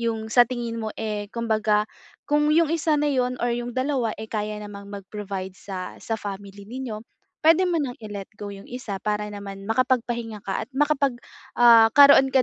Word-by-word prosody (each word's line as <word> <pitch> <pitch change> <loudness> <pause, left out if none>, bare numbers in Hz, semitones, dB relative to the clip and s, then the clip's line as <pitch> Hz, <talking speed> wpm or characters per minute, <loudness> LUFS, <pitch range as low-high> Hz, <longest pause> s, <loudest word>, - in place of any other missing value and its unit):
'Yong 225 -1 -2
sa 245 -1 +7
tingin 235 -2 -4
mo, 220 - -3
eh, 210 -2 -3
kumbaga, 215 -2 +1 0.4
kung 295 0 +2
'yong 330 -1 +4
isa 315 -2 +1
na 295 0 +1
'yon 250 -2 0
or 240 - +1
'yong 240 0 -3
dalawa, 255 -4 0
eh, 220 - -6
kaya 210 -1 -2
namang 200 -1 -9
mag-provide 195 -1 -6
sa 185 -2 -7
sa 225 - -2
family 200 0 -7
ninyo, 245 -3 -5 0.4
puwede 330 +3 +6
mo 340 -2 +1
ng 255 -4 -3
i-let 200 -2 -6
go 205 - -6
'yong 195 0 -11
isa. 235 -6 -5
Para 210 0 -1
naman, 195 -1 -8
makapagpahinga 235 -3 0
ka 195 +2 -2
at - - -31
makapag, 285 -3 +2 0.4
ah, 230 -2 +8
karoon 280 -1 +8
ka 260 -1 +5
225 Hz, 185 wpm, -24 LUFS, 205-255 Hz, 0.4 s, ah